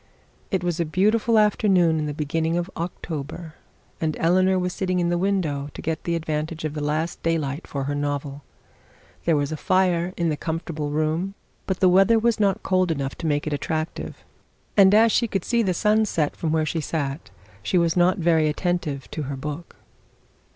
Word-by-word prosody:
It 190 -3 -1
was 175 -2 -1
a - - +3
beautiful 215 +7 +2
afternoon 190 -6 +3
in 150 - -2
the 150 - -3
beginning 160 +3 -1
of 175 +2 -3
October, 160 -1 -5 0.5
and 155 -1 -1
Eleanor 185 +3 +3
was 180 0 -1
sitting 185 -1 -1
in 170 -1 +1
the 175 - +1
window 165 -8 -1
to - - -7
get 160 0 -3
the 170 - 0
advantage 155 0 -3
of 150 - -3
the 150 -1 -4
last 155 +3 -2
daylight 160 -2 -1
for 140 -1 -3
her 145 +2 -2
novel. 145 0 -3 0.8
There 165 - +3
was 145 0 0
a 155 - -3
fire 180 0 +1
in 170 -1 +1
the 155 - 0
comfortable 160 -2 -3
room, 155 +6 -1 0.3
but 190 -1 -2
the 185 - +6
weather 195 +5 +5
was 225 0 +1
not 200 -3 +1
cold 185 -1 +2
enough 140 -4 -2
to 165 - -2
make 145 -1 0
it 155 - -2
attractive; 155 +2 -4 0.5
and 195 -2 +7
as 225 +1 +6
she 235 - +2
could 195 -4 -2
see 235 -1 +2
the 195 -5 +1
sun 215 +3 +3
set 155 -7 -1
from 160 - -2
where 160 0 +1
she 160 +1 -2
sat, 145 -1 -3 0.3
she 180 - 0
was 170 -1 +2
not 180 +2 +3
very 165 -3 +3
attentive 150 -4 -2
to 155 - -4
her 140 - -3
book. 150 +5 -6
165 Hz, 195 wpm, -24 LUFS, 150-185 Hz, 0.8 s, and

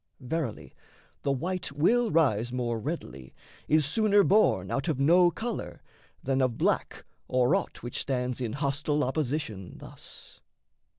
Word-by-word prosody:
Verily, 130 -2 -4 0.5
the 140 - 0
white 180 +7 -2
Will 225 +11 +3
rise 120 - +2
more 120 -2 -2
readily, 70 - -6 0.3
is 155 -1 +3
sooner 205 +6 +3
born 175 - +3
Out 140 - -1
of 155 -5 0
no 175 +5 +5
colour, 230 +6 -5 0.4
than 135 0 +1
of 125 -3 +1
black - - -1 0.2
or 125 +4 +2
aught 195 -1 -2
Which 120 - -3
stands 125 -1 -2
in 115 -3 -2
hostile 145 +2 0
opposition 130 - -2
thus. - - -11
140 Hz, 135 wpm, -28 LUFS, 125-165 Hz, 0.5 s, no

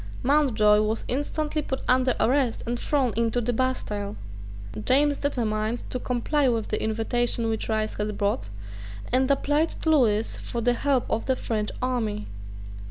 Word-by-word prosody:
Mountjoy 235 -7 +4
was 215 +1 -1
instantly 300 +3 -1
put 265 -2 -4
under 255 0 +3
arrest 255 -1 +1
and 240 +1 -2
thrown 265 -6 +1
into 230 +1 +1
the 240 +1 -1
Bastile. 220 -5 -2 0.7
James 285 +1 +3
determined 225 -4 -1
to 250 - -2
comply 255 +3 +1
with 230 -2 -1
the 215 - -1
invitation 230 +1 0
which 220 0 -2
Rice 215 -1 0
had 210 0 -3
brought, 200 - -1 0.6
and 260 +1 +3
applied 290 +3 +2
to 320 - -3
Lewis 225 -7 +2
for 235 - -5
the 240 +1 +2
help 270 0 +1
of 225 - -2
a 260 - +4
French 215 -4 -2
army. 220 -5 -1
240 Hz, 155 wpm, -25 LUFS, 220-265 Hz, 0.7 s, Mountjoy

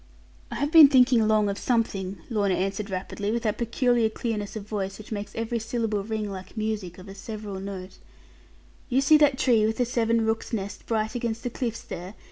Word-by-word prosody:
'I - - -6
have 290 +1 -1
been 320 -3 +10
thinking 250 -4 +5
long 215 -1 +3
of 200 0 -2
something,' 200 -5 -1
Lorna 200 -5 +1
answered 195 +2 -2
rapidly, 195 +2 -3
with 235 +1 -1
that 215 -2 -1
peculiar 235 -1 +2
clearness 215 -3 -4
of 210 -2 -6
voice 195 -2 -3
which 215 - -12
made 205 -1 -4
every 230 +1 -2
syllable 225 -2 -2
ring 215 -1 -3
like 190 +3 -9
music 215 -5 -3
of 185 +1 -12
a 195 - -8
several 205 -1 -7
note, 190 -1 -7 0.9
'you 255 +1 +3
see 275 +3 +6
that 290 -3 +4
tree 235 -5 +3
with 220 +1 0
the 245 - +2
seven 230 -1 +1
rooks' 225 +2 -2
nests 205 -2 -3
bright 220 -1 -1
against 235 -2 -3
the 245 - -3
cliffs 235 -2 -3
there? 185 +4 -7
220 Hz, 200 wpm, -26 LUFS, 200-235 Hz, 0.9 s, been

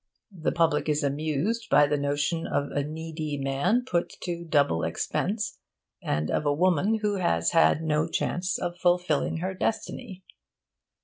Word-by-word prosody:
The 160 - -1
public 165 -2 +1
is 150 +1 +1
amused 155 +10 -1
by 145 - +6
the 145 +1 0
notion 145 +3 -1
of 140 0 -1
a 145 - 0
needy 155 0 -4
man 140 - +1
put 175 -8 0
to 170 -1 -3
double 145 - +2
expense, 205 - -2 0.4
and 75 +1 -1
of - - 0
a 145 -1 +2
woman 185 +6 +2
who 205 -1 +1
has 85 - +1
had 165 -1 +4
no 155 0 +1
chance 180 +2 -1
of 175 0 -4
fulfilling 175 -5 +1
her 190 - -2
destiny. 190 0 -3
160 Hz, 150 wpm, -27 LUFS, 145-180 Hz, 0.4 s, by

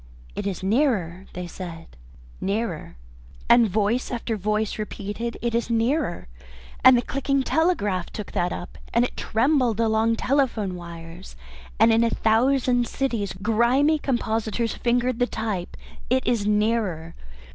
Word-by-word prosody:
"It - - -3
is 190 -2 -4
nearer!" 195 - 0
they 180 0 -5
said. 170 -2 -9 0.5
"Nearer!" 200 - -3 0.5
And 235 -2 +6
voice 215 +5 0
after 235 -2 -3
voice 215 +1 -1
repeated, 215 +2 -4
"It 235 -1 0
is 235 0 0
nearer," 230 - 0 0.6
and 260 0 +8
the 240 - 0
clicking 275 +1 0
telegraph 210 - 0
took 210 - -7
that 175 0 0
up, 175 - -7 0.2
and 235 +1 +4
it - - -6
trembled 245 -1 +1
along 225 0 +2
telephone 240 -7 0
wires, 170 0 -10 0.4
and 225 +1 +6
in 225 +1 +4
a 230 - +3
thousand 245 +2 +2
cities 230 -9 -2
grimy 245 +8 +3
compositors 230 -3 -1
fingered 245 0 0
the 245 - +2
type. 210 -7 -4 0.3
"It 260 +1 +1
is 220 -4 +1
nearer." 210 -6 0
225 Hz, 135 wpm, -24 LUFS, 200-245 Hz, 0.6 s, and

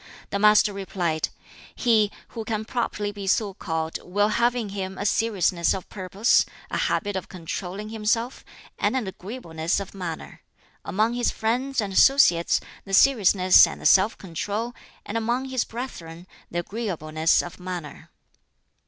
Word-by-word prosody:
The 200 - -1
master 210 0 +5
replied, 180 -5 -2 0.5
"He 220 -4 +3 0.2
who 225 - -6
can 220 -1 -3
properly 215 -3 -2
be 200 -1 -7
so 200 +1 +1
called 160 -3 -3
will 205 +3 +1
have 235 +3 +2
in 230 -4 -3
him 190 -1 -5
a 205 - -4
seriousness 195 -6 +1
of 190 - -7
purpose, 195 +4 +2 0.3
a - - -2
habit 205 -1 0
of 190 - -4
controlling 185 +3 -6
himself, 225 +3 -1 0.4
and - - +1
an 250 - -1
agreeableness 180 -4 -3
of 200 - -7
manner: 175 -5 -7 0.4
among 215 +4 0
his 245 0 +1
friends 250 +3 -1
and 200 -2 -4
associates 190 -9 +5 0.2
the 195 -1 0
seriousness 200 -7 +6
and - - -7
the - - -11
self 195 +4 +5
control, 205 +6 -4 0.3
and 225 +2 -2
among 240 +4 -1
his 260 -2 0
brethren 175 -9 -7 0.2
the 175 - -2
agreeableness 165 -6 0
of 175 +1 -9
manner." 180 -4 -7
200 Hz, 150 wpm, -25 LUFS, 180-225 Hz, 0.5 s, seriousness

